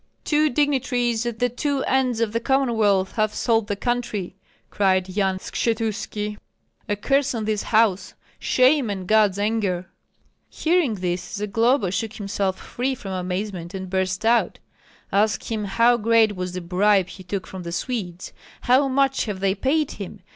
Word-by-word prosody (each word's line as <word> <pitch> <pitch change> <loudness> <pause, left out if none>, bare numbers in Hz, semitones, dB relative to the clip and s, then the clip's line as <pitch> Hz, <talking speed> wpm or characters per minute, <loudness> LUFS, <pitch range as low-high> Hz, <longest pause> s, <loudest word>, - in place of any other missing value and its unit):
"Two 305 0 +2
dignitaries 245 -4 0
at 235 -2 -3
the 245 - +2
two 275 +3 -2
ends 255 -3 +1
of 225 -2 0
the 230 - +1
Commonwealth 225 -7 +1
have 215 -1 +1
sold 225 -3 +1
the 205 - -1
country!" 220 -5 -2 0.4
cried 190 -2 +2
Yan 190 0 0
Skshetuski. 210 -1 -2 0.5
"A 205 - +1
curse 275 +5 +1
on 220 -2 -3
this 215 -1 0
house, 210 -4 +1 0.2
shame 260 -1 +3
and 190 -2 -4
God's 210 -2 +4
anger!" 205 -4 -1 0.6
Hearing 325 -8 +1
this, 180 -1 -2
Zagloba 210 +1 +1
shook 220 +4 -2
himself 200 -3 -2
free 260 +2 -3
from 200 -6 -8
amazement 185 0 -4
and 190 -1 -6
burst 190 +1 -1
out: 235 +1 +2 0.5
"Ask 205 +3 +1
him 215 -2 -2
how 230 +5 +3
great 225 -1 +3
was 180 -1 -4
the 185 - -4
bribe 190 +2 +2
he 185 +1 -11
took 185 +1 -4
from 190 - -8
the 170 -1 -6
Swedes? 185 -3 -4 0.3
How 260 +3 +4
much 270 0 +1
have 205 -4 -4
they 195 0 +1
paid 275 +8 0
him? 200 0 -8
215 Hz, 160 wpm, -23 LUFS, 190-245 Hz, 0.6 s, God's